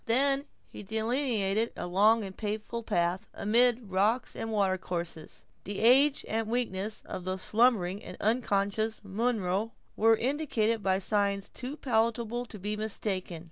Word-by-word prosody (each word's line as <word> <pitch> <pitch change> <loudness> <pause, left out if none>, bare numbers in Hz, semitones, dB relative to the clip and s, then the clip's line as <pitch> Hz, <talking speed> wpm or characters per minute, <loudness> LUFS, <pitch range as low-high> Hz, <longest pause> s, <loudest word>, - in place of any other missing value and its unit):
Then 275 +4 +3 0.3
he - - -8
delineated 220 0 0
a - - -4
long 210 +5 +4
and 190 -1 -7
painful 215 +2 -4
path, 180 0 -1
amid 235 0 +2
rocks 210 +6 +1
and 225 - -4
water 200 -3 +2
courses. 170 -3 -6 0.2
The 200 +1 -5
age 270 +6 +5
and 225 0 -1
weakness 220 -3 -2
of 185 - -6
the 185 +1 -2
slumbering 210 -2 +2
and - - -9
unconscious 215 -1 0
Munro 210 0 -1 0.2
were 225 +1 +5
indicated 235 -5 0
by 190 -1 +2
signs 200 0 0
too 260 +4 -6
palpable 235 -1 0
to 215 - -9
be 205 +2 -3
mistaken. 200 -5 -3
215 Hz, 140 wpm, -29 LUFS, 195-235 Hz, 0.3 s, age